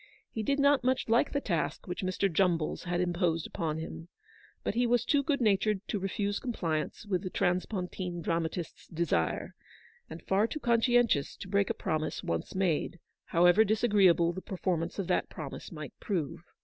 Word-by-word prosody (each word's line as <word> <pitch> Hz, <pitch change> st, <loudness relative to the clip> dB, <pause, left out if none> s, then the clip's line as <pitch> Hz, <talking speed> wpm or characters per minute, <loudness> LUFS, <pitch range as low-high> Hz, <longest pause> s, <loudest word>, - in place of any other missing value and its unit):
He 220 Hz, -, -3 dB
did 275 Hz, +6 st, 0 dB
not 280 Hz, -1 st, +4 dB
much 255 Hz, -2 st, +1 dB
like 235 Hz, +5 st, +3 dB
the 285 Hz, -, 0 dB
task 175 Hz, -, -2 dB
which 180 Hz, -, -4 dB
Mr. 185 Hz, +1 st, +1 dB
Jumballs 175 Hz, -3 st, +1 dB
had 175 Hz, 0 st, -1 dB
imposed 175 Hz, -2 st, 0 dB
upon 160 Hz, -2 st, -3 dB
him, 160 Hz, +1 st, -7 dB, 0.6 s
but -, -, -1 dB
he 240 Hz, +2 st, +2 dB
was 240 Hz, -1 st, +2 dB
too 290 Hz, -2 st, +3 dB
good 280 Hz, +1 st, 0 dB
natured 210 Hz, -2 st, +2 dB
to 205 Hz, -, -1 dB
refuse 200 Hz, +1 st, -1 dB
compliance 165 Hz, -9 st, -2 dB
with 185 Hz, -4 st, 0 dB
the 185 Hz, -, -4 dB
transpontine 180 Hz, -1 st, -2 dB
dramatist's 165 Hz, 0 st, -3 dB
desire, 160 Hz, -, -1 dB, 0.6 s
and 160 Hz, +1 st, -9 dB
far 200 Hz, +3 st, +2 dB
too 305 Hz, -, -5 dB
conscientious 235 Hz, -, +2 dB
to -, -, -9 dB
break 200 Hz, 0 st, +1 dB
a -, -, 0 dB
promise 155 Hz, 0 st, -2 dB
one 85 Hz, -1 st, 0 dB
made, 180 Hz, -2 st, 0 dB, 0.3 s
however 175 Hz, +5 st, +5 dB
disagreeable 200 Hz, -6 st, +4 dB
the 185 Hz, -, -6 dB
per 190 Hz, -, -7 dB
formance 170 Hz, -2 st, -1 dB
of 195 Hz, -, -1 dB
that -, -, 0 dB
promise -, -, -7 dB
might -, -, -7 dB
prove. 170 Hz, -, -2 dB
185 Hz, 175 wpm, -30 LUFS, 170-220 Hz, 0.6 s, however